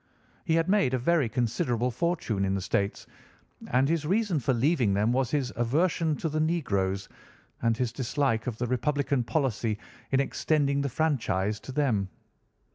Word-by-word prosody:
He 160 - +2
had 165 +1 +2
made 190 -10 +3
a - - +1
very 140 0 +2
considerable 120 +1 0
fortune 125 - -1
in 95 0 +1
the 95 - -2
States, 100 +1 -1 0.6
and 130 +2 +2
his 165 0 0
reason 190 0 +1
for 135 - 0
leaving 125 - +2
them 105 +3 +2
was 130 -1 +1
his 140 -4 -1
aversion 155 +6 +1
to 165 - -3
the 155 0 -1
negroes, 100 - 0 0.5
and 115 -1 +2
his 120 -2 -1
dislike 130 -2 0
of 120 -3 -3
the 125 - -1
Republican 135 +2 0
policy 115 -5 -1 0.3
in 135 - +3
extending 140 0 +1
the 140 - -1
franchise 110 -9 0
to - - -9
them. 125 -9 0
130 Hz, 165 wpm, -28 LUFS, 115-150 Hz, 0.6 s, made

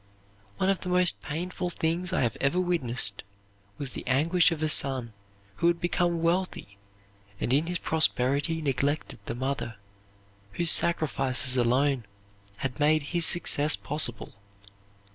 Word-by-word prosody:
One 190 +1 +2
of 195 - -2
the 180 - -6
most 180 -1 +2
painful 175 +4 -4
things 175 +2 -2
I 185 - 0
have 120 -4 0
ever 140 +7 +1
witnessed 125 - +1 0.6
was 140 -3 -6
the - - -7
anguish 165 +7 +3
of 160 -1 -3
a - - +2
son 130 -6 +2 0.4
who 170 - +1
had 170 0 +1
become 175 -1 -1
wealthy 170 - -2 0.6
and 125 - -1
in 150 +4 +1
his 180 0 -2
prosperity 155 +1 0
neglected 140 0 -2
the 115 - -4
mother, 130 -3 -4 0.8
whose 170 +6 +3
sacrifices 135 -6 +1
alone 125 +1 +1 0.5
had 130 +3 -5
made 155 +1 +3
his 170 -2 +5
success 150 -3 +4
possible. 140 -6 -4
150 Hz, 140 wpm, -27 LUFS, 130-170 Hz, 0.8 s, his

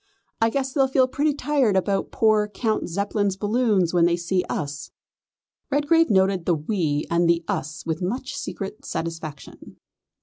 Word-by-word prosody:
I 225 - +4
guess 265 +1 -2
they'll 270 -2 +3
feel 260 -1 +3
pretty 290 +3 0
tired 275 -7 +1
about 195 +1 0
poor 215 -1 +3
Count 215 -1 -2
Zeppelin's 200 +1 -1
balloon 210 -1 +2
when 175 -2 +4
they 170 0 +2
see 180 +1 0
us." 145 -1 -4 0.8
Redgrave 295 +3 +3
noted 190 -3 +2
the 175 - +3
"we" 155 -2 -1
and 170 0 +3
the 170 0 +2
"us" 155 +3 -4
with 160 +1 -2
much 245 +9 -3
secret 200 +1 -6
satisfaction. 160 -3 -6
200 Hz, 155 wpm, -24 LUFS, 170-250 Hz, 0.8 s, I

